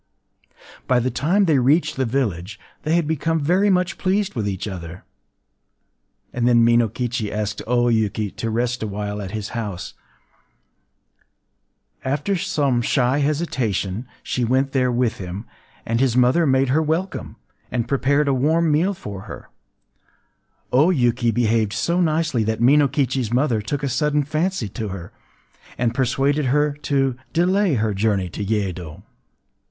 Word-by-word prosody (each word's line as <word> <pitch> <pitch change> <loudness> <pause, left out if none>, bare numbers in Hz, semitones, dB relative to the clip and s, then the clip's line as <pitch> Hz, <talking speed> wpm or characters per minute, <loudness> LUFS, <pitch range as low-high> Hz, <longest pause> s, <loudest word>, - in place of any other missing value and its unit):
” - - -23
By 125 -1 +3
the 125 +2 -1
time 180 - +2
they 155 -6 +3
reached 145 +7 +2
the 130 - 0
village, 105 -6 -2 0.2
they 155 +2 0
had 170 -2 +2
become 160 +1 0
very 180 +7 +2
much 180 -1 +1
pleased 195 +1 0
with 105 -5 -2
each 95 +1 -4
other; 90 -3 -7 1.3
and 120 -1 0
then 120 -1 +5
Minokichi 115 -1 +1
asked 105 -1 -3
O 120 0 +2
Yuki 110 -3 0
to 115 - -4
rest 120 +2 -1
awhile 105 -1 -4
at 95 - -5
his 105 0 -5
house. 105 -8 -5 2.1
After 145 +9 -1
some 150 -9 0
shy 125 +3 +1
hesitation, 125 - -1 0.2
she 125 - -2
went 130 +3 +1
there 130 -2 +1
with 120 -1 0
him; 95 +3 -6 0.4
and 115 +1 0
his 130 -2 +2
mother 130 +7 +4
made 130 0 +2
her 150 +5 +3
welcome, 160 +5 -2 0.4
and 120 -2 -1
prepared 140 +2 +1
a 140 - +3
warm 155 +5 +2
meal 175 +7 +2
for 100 - -7
her. - - -9 1.2
O 145 +7 +5
Yuki 120 -7 +2
behaved 115 -2 +1
so 175 +2 0
nicely 155 -7 +1
that 110 +1 -1
Minokichi’s 135 -2 +2
mother 125 -3 +1
took 140 +7 -4
a - - +1
sudden 150 +3 +1
fancy 155 - -1
to 110 +3 -5
her, 95 -3 -7 0.7
and 120 -1 0
persuaded 135 +3 +1
her 150 +3 +2
to 135 -3 0 0.2
delay 185 0 +2
her 110 -2 0
journey 100 -2 0
to 100 - -5
Yedo. 95 -5 -3
125 Hz, 150 wpm, -21 LUFS, 110-150 Hz, 2.1 s, then